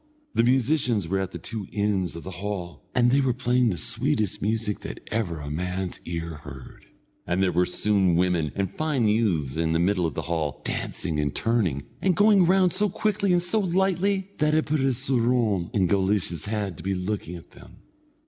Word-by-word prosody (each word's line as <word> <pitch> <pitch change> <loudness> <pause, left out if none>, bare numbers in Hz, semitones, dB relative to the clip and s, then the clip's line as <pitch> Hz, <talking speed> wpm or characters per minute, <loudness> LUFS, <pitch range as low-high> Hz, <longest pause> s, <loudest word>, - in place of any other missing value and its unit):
The - - +3
musicians 125 - +2
were 95 +3 0
at 95 -1 -2
the - - -7
two 110 -4 -6
ends 100 -5 0
of 85 - -7
the 95 - -7
hall, 90 -5 -5
and 120 -1 +4
they 140 +2 +4
were 130 -3 +1
playing 125 -1 +2
the 90 - -2
sweetest 115 - 0
music 110 0 -1
that - - -7
ever 95 -8 -1
a 75 -1 -6
man's 90 +3 -3
ear 85 -1 -4
heard, 70 -3 -11 0.4
and 90 +2 +1
there 95 - +2
were 90 0 +2 0.2
young 95 -4 +3
women 85 -4 +1
and 100 -1 0
fine 140 - 0
youths 95 - +1
in 80 0 +1
the 80 - +2
middle 90 0 +2
of 80 - -6
the - - -3
hall, 80 -4 -3
dancing 75 -2 -3
and 75 -1 -1
turning, 100 - 0 0.2
and 185 -2 +2
going 205 -3 +5
round 185 -1 +4
so 205 +2 +1
quickly 200 0 0
and 175 -1 +3
so 180 +5 0
lightly, 190 +1 +1
that 150 0 +3
it 155 - +2
put 155 +1 0
a 135 0 +2
soorawn 120 -7 +1
in 95 -3 +2
Guleesh's 95 -3 0
head 100 -5 -3
to - - -10
be 95 0 -1
looking 90 -2 -3
at 85 - -12
them. - - -16
105 Hz, 200 wpm, -25 LUFS, 85-130 Hz, 0.4 s, going